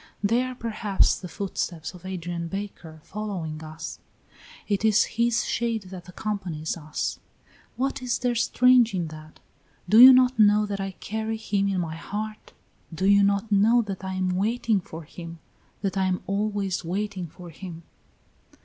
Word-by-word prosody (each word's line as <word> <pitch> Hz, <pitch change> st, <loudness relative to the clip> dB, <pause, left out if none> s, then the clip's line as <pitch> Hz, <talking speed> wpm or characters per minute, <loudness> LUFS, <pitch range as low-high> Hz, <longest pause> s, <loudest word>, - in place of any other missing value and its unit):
They 230 Hz, +4 st, +3 dB
are 255 Hz, 0 st, -4 dB
perhaps 215 Hz, -4 st, +1 dB
the 185 Hz, -, -7 dB
footsteps 175 Hz, -2 st, -4 dB
of 180 Hz, 0 st, -11 dB
Adrian 175 Hz, -2 st, -4 dB
Baker 175 Hz, -5 st, -7 dB
following 180 Hz, -7 st, -5 dB
us; 155 Hz, 0 st, -7 dB, 0.7 s
it 205 Hz, 0 st, 0 dB
is 215 Hz, -2 st, +5 dB
his 235 Hz, 0 st, +1 dB
shade 230 Hz, -3 st, -1 dB
that 180 Hz, -1 st, -9 dB
accompanies 180 Hz, -6 st, -3 dB
us. 155 Hz, -2 st, -4 dB, 0.6 s
What 270 Hz, +1 st, -1 dB
is 250 Hz, -2 st, 0 dB
there 245 Hz, -1 st, 0 dB
strange 240 Hz, -1 st, +4 dB
in 170 Hz, -3 st, -2 dB
that? 155 Hz, 0 st, -12 dB, 0.5 s
Do 215 Hz, +5 st, +6 dB
you 255 Hz, +2 st, +12 dB
not 255 Hz, -1 st, +4 dB
know 210 Hz, 0 st, +5 dB
that 200 Hz, -1 st, -4 dB
I 195 Hz, 0 st, -4 dB
carry 220 Hz, +3 st, -4 dB
him 200 Hz, -2 st, 0 dB
in 195 Hz, -2 st, 0 dB
my 160 Hz, -1 st, -4 dB
heart? 215 Hz, +5 st, -6 dB, 0.4 s
Do 165 Hz, +3 st, -2 dB
you 200 Hz, 0 st, +6 dB
not 200 Hz, +2 st, +1 dB
know 220 Hz, +4 st, +5 dB
that 195 Hz, -3 st, -6 dB
I 190 Hz, 0 st, -3 dB
am 185 Hz, 0 st, 0 dB
waiting 220 Hz, +1 st, +1 dB
for 165 Hz, -1 st, -9 dB
him, 165 Hz, +2 st, -9 dB, 0.5 s
that 195 Hz, -2 st, -1 dB
I 190 Hz, -1 st, +1 dB
am 185 Hz, -1 st, -1 dB
always 200 Hz, -1 st, -1 dB
waiting 185 Hz, +1 st, -3 dB
for 175 Hz, +2 st, -12 dB
him?" 170 Hz, 0 st, -9 dB
200 Hz, 165 wpm, -26 LUFS, 175-220 Hz, 0.7 s, you